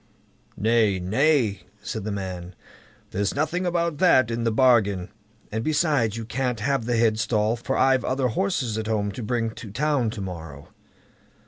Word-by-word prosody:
"Nay, 110 -3 +2
nay!" 110 - +2 0.2
said 105 -1 -5
the 110 - -2
man, 95 -2 -5 0.6
"there's 100 +1 -1
nothing 170 +5 0
about 170 -3 -1
that 130 -10 +4
in 115 0 -2
the 115 - +2
bargain; 110 -7 +3 0.4
and 110 +1 -2
besides, 145 - +1
you 115 - -5
can't 125 0 -2
have 135 +1 0
the 120 0 0
headstall, 110 -1 +2
for 120 +3 -3
I've 130 -1 +3
other 130 -1 0
horses 125 - -1
at 110 - -4
home 105 -2 0
to 110 - -7
bring 115 0 -1
to 110 -1 -10
town 130 +1 0
to 110 -2 -6
morrow." 80 -7 -8
115 Hz, 160 wpm, -24 LUFS, 105-135 Hz, 0.6 s, that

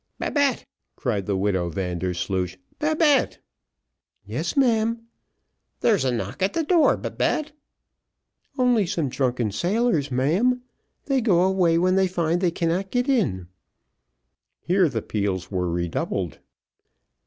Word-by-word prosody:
"Babette," 285 -4 0 0.3
cried 105 -7 -2
the 100 -2 0
widow 95 -3 0
Vandersloosh, 90 +1 -2 0.2
"Babette." 305 -1 +2 0.9
"Yes, - - -3
ma'am." 230 -3 +2 0.8
"There's 210 - +3
a 130 - +1
knock 120 +9 -4
at 190 +2 +1
the 330 - 0
door, 335 0 +4
Babette." 310 0 -1 1.1
"Only 245 -6 +3
some 165 -7 -1
drunken 125 -4 -1
sailors, 175 - 0
ma'am 180 - +1 0.4
they 270 -2 +1
go 185 -6 +3
away 185 -3 +3
when 185 +2 +2
they 190 0 +3
find 175 -1 0
they 180 - +3
cannot 170 +3 -1
get 245 +4 0
in." 145 - 0 1.1
Here 180 -2 +2
the 115 -5 -3
peals 100 -3 -2
were 90 -2 -1
redoubled. 85 0 -2
175 Hz, 120 wpm, -24 LUFS, -, 1.1 s, door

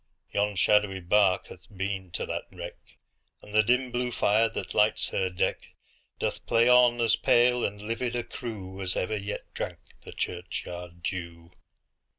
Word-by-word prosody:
Yon 105 0 0
shadowy 105 0 +3
bark 95 +1 +3
hath - - -13
been 95 -1 -3
to - - -3
that - - -4
wreck, - - -10 0.5
And 105 - -13
the 110 - +6
dim 125 +3 +1
blue 125 0 -1
fire, 110 0 +3
that 115 - -5
lights 105 +1 +2
her 95 - 0
deck, 90 - -2 0.4
Doth - - -2
play 115 0 +4
on 125 -1 +6
as 115 -1 +4
pale 120 +1 +4
and 100 0 -2
livid 115 +3 -3
a 120 - -1
crewAs 95 -5 -5
ever 100 +4 -1
yet 100 0 -5
drank - - -4 0.2
the - - -11
churchyard 85 -1 -5
dew. 85 -1 -5
105 Hz, 160 wpm, -28 LUFS, 95-120 Hz, 0.5 s, the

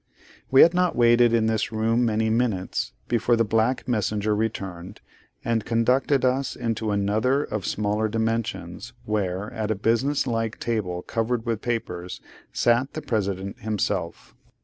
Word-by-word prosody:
We 135 - +7
had 170 - +7
not 180 -1 +1
waited 120 0 +5
in 115 -1 +2
this 110 0 0
room 115 +2 +1
many 110 -1 +1
minutes, 110 -6 -1 0.2
before 120 0 +2
the 115 - +2
black 115 +4 0
messenger 105 -2 0
returned, 100 -3 -4 0.5
and 115 -2 0
conducted 125 +4 +2
us 130 +1 0
into 110 -1 -2
another 110 +7 +1
of 105 -8 -4
smaller 105 +1 0
dimensions, 115 -1 -3
where, 100 -1 -2
at 110 -2 -3
a 110 - +1
business 120 +8 +1
like 115 -3 -2
table 95 -7 -2
covered 115 0 -2
with 115 -2 -2
papers, 90 -7 -4 0.3
sat 120 +3 +1
the 155 - -5
President 100 0 -2
himself. 110 - -3
110 Hz, 145 wpm, -24 LUFS, 105-120 Hz, 0.5 s, We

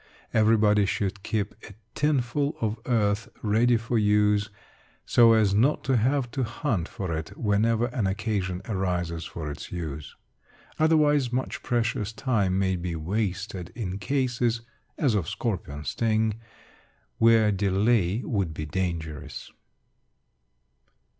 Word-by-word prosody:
Everybody 105 -2 +4
should 100 0 -2
keep 105 0 -2 0.2
a 100 - -13 0.2
tinful 145 -1 0
of 110 0 -2
earth 105 -4 +1
ready 115 +3 +3
for 115 +1 -1
use, 105 0 +3 0.6
so 115 -1 +6
as 110 -3 +3
not 125 +9 +2
to 130 0 +1
have 125 +2 +1
to 135 - -2
hunt 115 - -2
for 90 -4 -4
it 80 0 -6
whenever 110 +2 +2
an 120 -4 -1
occasion 95 -2 -2
arises 90 -5 -2
for 80 -3 -5
its 75 - -8
use. 75 -5 -6 0.6
Otherwise, 150 -5 +3
much 130 +1 -2
precious 115 -3 -1
time 105 -7 0
may 95 -1 +1
be 85 -1 -3
wasted 95 +1 -3
in 100 -5 -4
cases 125 -2 0 0.4
(as 135 -7 +2
of 95 -7 0
scorpion 85 -10 -3
sting) 110 -1 0 0.8
where 115 -2 +5
delay 100 +2 +1
would 95 -8 -1
be 75 - -4
dangerous. 80 -4 -4
105 Hz, 125 wpm, -26 LUFS, 95-115 Hz, 0.8 s, so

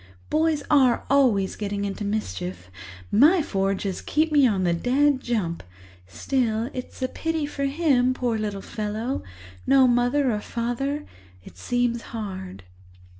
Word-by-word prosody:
Boys 310 -1 +1
are 265 -5 +3
always 235 -9 +3
getting 200 -1 -3
into 200 +1 -4
mischief—my 95 - 0
four 195 -5 0
just 190 -1 -5
keep 310 +1 +1
me 285 -3 +5
on 195 -5 0
the 175 -1 +2
dead 265 +9 +2
jump. 200 -10 -2 0.5
Still, 230 - -1
it's 255 +1 -7
a - - +2
pity 325 +2 -2
for 280 -1 -3
him, 275 -4 +2
poor 245 -3 -1
little 210 -2 -3
fellow! 220 +5 -3 0.5
No 270 -1 +6
mother 245 +3 +2
or 210 - -1
father—it 235 - -5
seems 240 - -1 0.2
hard." 190 - -6
235 Hz, 130 wpm, -24 LUFS, 195-275 Hz, 0.5 s, No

